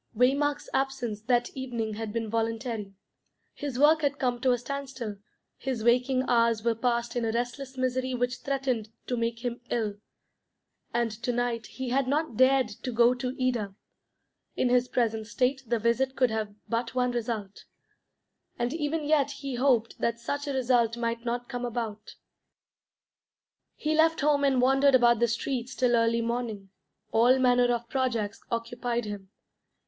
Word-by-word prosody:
Waymark's 280 Hz, +4 st, +2 dB
absence 265 Hz, -6 st, -1 dB
that 240 Hz, -1 st, +1 dB
evening 235 Hz, -5 st, -3 dB
had 220 Hz, 0 st, -4 dB
been 230 Hz, 0 st, -2 dB
voluntary. 225 Hz, -2 st, -2 dB, 0.6 s
His 280 Hz, -4 st, -5 dB
work 305 Hz, +3 st, +5 dB
had 285 Hz, -1 st, 0 dB
come 245 Hz, -3 st, -1 dB
to 260 Hz, -, +3 dB
a 245 Hz, -, +3 dB
standstill; 260 Hz, -4 st, -5 dB, 0.4 s
his 255 Hz, -5 st, -3 dB
waking 250 Hz, +2 st, +3 dB
hours 230 Hz, -2 st, +3 dB
were 235 Hz, -1 st, +2 dB
passed 235 Hz, +1 st, -1 dB
in 240 Hz, -, 0 dB
a 225 Hz, -, 0 dB
restless 245 Hz, +3 st, -3 dB
misery 255 Hz, 0 st, 0 dB
which 245 Hz, +1 st, -1 dB
threatened 265 Hz, -5 st, -2 dB, 0.2 s
to 250 Hz, -, -1 dB
make 230 Hz, +1 st, -2 dB
him 240 Hz, 0 st, -3 dB
ill. 215 Hz, -4 st, -1 dB, 0.9 s
And 235 Hz, -1 st, 0 dB
to 245 Hz, -, 0 dB
night 240 Hz, -2 st, -1 dB
he 260 Hz, -1 st, -5 dB
had 265 Hz, +1 st, +1 dB
not 295 Hz, -2 st, 0 dB
dared 260 Hz, 0 st, +4 dB
to 230 Hz, +4 st, -6 dB
go 235 Hz, +1 st, +5 dB
to 250 Hz, 0 st, -4 dB
Ida; 235 Hz, -6 st, -1 dB, 0.8 s
in 250 Hz, -, +1 dB
his 250 Hz, 0 st, +3 dB
present 225 Hz, -3 st, 0 dB
state 260 Hz, +3 st, 0 dB
the 235 Hz, +1 st, +1 dB
visit 235 Hz, +4 st, +1 dB
could 255 Hz, -3 st, +2 dB
have 215 Hz, -2 st, -3 dB
but 230 Hz, +1 st, -2 dB
one 250 Hz, -1 st, +2 dB
result, 225 Hz, -4 st, -4 dB, 0.9 s
and 240 Hz, +2 st, -1 dB
even 315 Hz, 0 st, -1 dB
yet 290 Hz, -2 st, +3 dB
he 275 Hz, -1 st, -6 dB
hoped 245 Hz, -3 st, +1 dB
that 235 Hz, 0 st, 0 dB
such 285 Hz, +5 st, -3 dB
a 280 Hz, -, -1 dB
result 240 Hz, -3 st, +2 dB
might 230 Hz, 0 st, -2 dB
not 240 Hz, +1 st, -2 dB
come 245 Hz, -2 st, -5 dB
about. 225 Hz, -3 st, -4 dB, 1.6 s
He 305 Hz, +1 st, -1 dB
left 320 Hz, +1 st, +3 dB
home 290 Hz, -1 st, +3 dB
and 270 Hz, -2 st, +3 dB
wandered 270 Hz, +2 st, +5 dB
about 240 Hz, -2 st, +5 dB
the 235 Hz, -, +3 dB
streets 240 Hz, +2 st, -3 dB
till 245 Hz, -1 st, +3 dB
early 230 Hz, 0 st, +2 dB
morning. 230 Hz, -4 st, -3 dB, 0.4 s
All 240 Hz, +3 st, +5 dB
manner 245 Hz, -1 st, +4 dB
of 235 Hz, -1 st, -2 dB
projects 230 Hz, -6 st, -1 dB
occupied 235 Hz, 0 st, -2 dB
him. 205 Hz, -2 st, -7 dB
245 Hz, 165 wpm, -28 LUFS, 230-260 Hz, 1.6 s, work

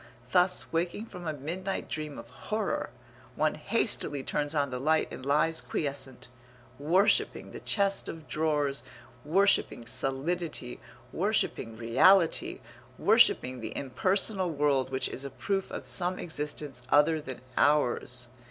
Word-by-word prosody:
Thus, 180 Hz, +2 st, +2 dB
waking 175 Hz, +6 st, -1 dB
from 180 Hz, -6 st, -9 dB
a 155 Hz, -, -1 dB
midnight 175 Hz, +7 st, -4 dB
dream 155 Hz, -2 st, -5 dB
of -, -, -9 dB
horror, 215 Hz, -2 st, -2 dB, 0.5 s
one 155 Hz, 0 st, +1 dB
hastily 155 Hz, -, -1 dB
turns 145 Hz, +3 st, -1 dB
on 140 Hz, -2 st, +1 dB
the 125 Hz, -, -3 dB
light 155 Hz, +4 st, +1 dB
and -, -, -8 dB
lies 150 Hz, +4 st, +2 dB
quiescent, 140 Hz, -4 st, -4 dB, 0.5 s
worshipping 175 Hz, +8 st, +2 dB
the -, -, -8 dB
chest 200 Hz, -2 st, +1 dB
of 160 Hz, -1 st, -8 dB
drawers, 150 Hz, -3 st, 0 dB, 0.4 s
worshipping 180 Hz, -7 st, +2 dB
solidity, 135 Hz, +1 st, -2 dB, 0.3 s
worshipping 115 Hz, -1 st, -1 dB
reality, 160 Hz, -, +3 dB, 0.4 s
worshipping 130 Hz, 0 st, +4 dB
the 110 Hz, -1 st, -6 dB
impersonal 185 Hz, -, +1 dB
world 145 Hz, -4 st, +1 dB
which 130 Hz, 0 st, 0 dB
is 130 Hz, -, -6 dB
a 140 Hz, -, -5 dB
proof 195 Hz, +6 st, -2 dB
of -, -, -6 dB
some 180 Hz, 0 st, +1 dB
existence 150 Hz, -4 st, -4 dB
other 155 Hz, +2 st, +4 dB
than 130 Hz, -4 st, -8 dB
ours. 125 Hz, -3 st, +2 dB
150 Hz, 130 wpm, -29 LUFS, 135-180 Hz, 0.5 s, worshipping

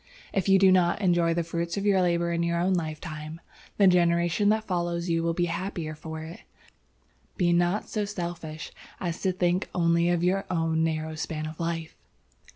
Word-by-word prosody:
If 195 Hz, 0 st, 0 dB
you 195 Hz, -, +7 dB
do 190 Hz, 0 st, +6 dB
not 180 Hz, -1 st, +3 dB
enjoy 175 Hz, -4 st, +2 dB
the 170 Hz, -, 0 dB
fruit 170 Hz, +2 st, -3 dB
of 200 Hz, -, -2 dB
your 195 Hz, -2 st, +4 dB
labor 170 Hz, -1 st, +1 dB
in 170 Hz, 0 st, 0 dB
your 170 Hz, 0 st, 0 dB
own 185 Hz, +2 st, +2 dB
lifetime, 155 Hz, -1 st, -4 dB, 0.4 s
the 200 Hz, -, +5 dB
generation 175 Hz, +1 st, +3 dB
that 220 Hz, +1 st, +2 dB
follows 175 Hz, -2 st, -2 dB
you 165 Hz, 0 st, +1 dB
will 165 Hz, 0 st, 0 dB
be 175 Hz, -, +1 dB
the 170 Hz, -, -3 dB
happier 170 Hz, -4 st, -4 dB
for 160 Hz, +1 st, -7 dB
it. 165 Hz, +2 st, -9 dB, 1.0 s
Be 175 Hz, -3 st, +3 dB
not 175 Hz, +4 st, +1 dB
so 210 Hz, -2 st, -2 dB
selfish 170 Hz, -5 st, -6 dB, 0.3 s
as 170 Hz, -2 st, -3 dB
to 190 Hz, -, +2 dB
think 180 Hz, 0 st, 0 dB
only 170 Hz, -1 st, +3 dB
of 175 Hz, -1 st, +1 dB
your 190 Hz, +2 st, +1 dB
own 165 Hz, -2 st, +1 dB
narrow 160 Hz, -1 st, -1 dB
span 155 Hz, 0 st, -4 dB
of 155 Hz, 0 st, -7 dB
life." 165 Hz, -1 st, -3 dB
170 Hz, 190 wpm, -27 LUFS, 165-180 Hz, 1.0 s, you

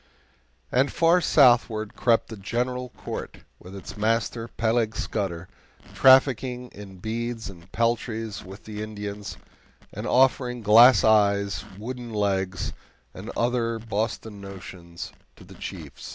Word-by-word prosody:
And 130 Hz, +2 st, +2 dB
far 170 Hz, +2 st, +4 dB
southward 120 Hz, -7 st, +4 dB
crept 115 Hz, -2 st, +2 dB
the 110 Hz, -, -6 dB
GENERAL 125 Hz, +5 st, -3 dB
COURT -, -, -7 dB, 0.2 s
with 90 Hz, +2 st, -11 dB
its 95 Hz, -, -9 dB
master, 115 Hz, +1 st, 0 dB
Peleg 115 Hz, -1 st, 0 dB
Scudder, 90 Hz, -5 st, -3 dB, 0.5 s
trafficking 130 Hz, -2 st, +4 dB
in 100 Hz, -2 st, -11 dB
beads 115 Hz, +2 st, -4 dB
and 85 Hz, 0 st, -17 dB
peltries 115 Hz, -2 st, -1 dB
with 95 Hz, +1 st, -12 dB
the 105 Hz, -1 st, -6 dB
Indians, 105 Hz, -1 st, -6 dB, 0.6 s
and -, -, -5 dB
offering 125 Hz, -2 st, +2 dB
glass 115 Hz, +1 st, +7 dB
eyes, 100 Hz, -4 st, +3 dB
wooden 120 Hz, +2 st, -6 dB
legs, 95 Hz, -3 st, -1 dB, 0.4 s
and -, -, -8 dB
other 115 Hz, -1 st, 0 dB
Boston 110 Hz, -1 st, -4 dB
notions 90 Hz, -3 st, -9 dB, 0.2 s
to -, -, -15 dB
the -, -, -14 dB
chiefs. -, -, -8 dB
110 Hz, 125 wpm, -25 LUFS, 100-120 Hz, 0.6 s, glass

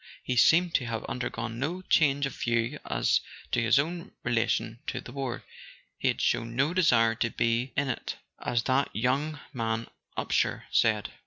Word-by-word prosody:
He 125 Hz, -, -1 dB
seemed 170 Hz, +8 st, +5 dB
to 125 Hz, -, +2 dB
have 115 Hz, -1 st, -3 dB
undergone 120 Hz, -2 st, -4 dB
no 170 Hz, +7 st, -2 dB
change 145 Hz, -5 st, +3 dB
of 140 Hz, -, -4 dB
view 115 Hz, 0 st, 0 dB
as -, -, +2 dB, 0.3 s
to 120 Hz, -, +2 dB
his 115 Hz, +3 st, +4 dB
own 170 Hz, +7 st, -1 dB
relation 115 Hz, -1 st, 0 dB
to -, -, -2 dB
the -, -, -10 dB
war; 135 Hz, -3 st, -4 dB, 0.6 s
he -, -, 0 dB
had -, -, +1 dB
shown 115 Hz, 0 st, 0 dB
no 135 Hz, +6 st, +2 dB
desire 120 Hz, -11 st, +4 dB
to 115 Hz, +1 st, -1 dB
"be 115 Hz, +3 st, 0 dB
in 140 Hz, 0 st, +2 dB
it," 125 Hz, -, -3 dB, 0.2 s
as 120 Hz, -1 st, 0 dB
that 135 Hz, +3 st, +2 dB
mad -, -, -1 dB
young 140 Hz, +5 st, 0 dB, 0.8 s
Upsher -, -, 0 dB
said. -, -, +2 dB
125 Hz, 170 wpm, -28 LUFS, 115-145 Hz, 0.8 s, seemed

